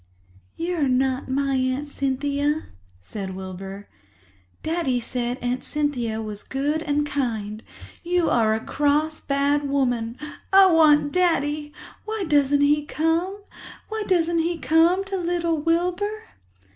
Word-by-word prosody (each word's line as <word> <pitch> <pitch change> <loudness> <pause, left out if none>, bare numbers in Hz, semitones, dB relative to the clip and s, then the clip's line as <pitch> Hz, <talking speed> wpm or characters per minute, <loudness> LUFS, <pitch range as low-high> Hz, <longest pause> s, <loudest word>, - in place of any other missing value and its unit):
"You 350 +1 -2
are 290 -3 +2
not 260 +1 0
my 275 +1 0
Aunt 260 +3 -1
Cynthia," 285 +2 -1 0.4
said 190 - -6
Wilbur. 190 +1 -8 0.8
"Daddy 315 -6 0
said 245 +1 -2
Aunt 245 +1 -1
Cynthia 255 -7 -1
was 210 -1 -6
good 290 +4 -2
and 295 -2 0
kind—you 255 +7 -3
are 220 -2 +3
a 220 - -5
cross, 300 +2 +1
bad 280 +1 +1
woman. 245 -4 0 0.3
I 385 -1 +7
want 300 -3 +5
Daddy. 300 -4 +1 0.3
Why 435 -1 -3
doesn't 285 -2 +3
he 295 +1 +3
come? 330 +7 -1 0.5
Why 440 -1 -3
doesn't 340 -2 +2
he 335 +1 0
come 330 +4 +3
to 390 0 -4
little 340 -2 0
Wilbur?" 360 +6 0
290 Hz, 125 wpm, -24 LUFS, 255-335 Hz, 0.8 s, I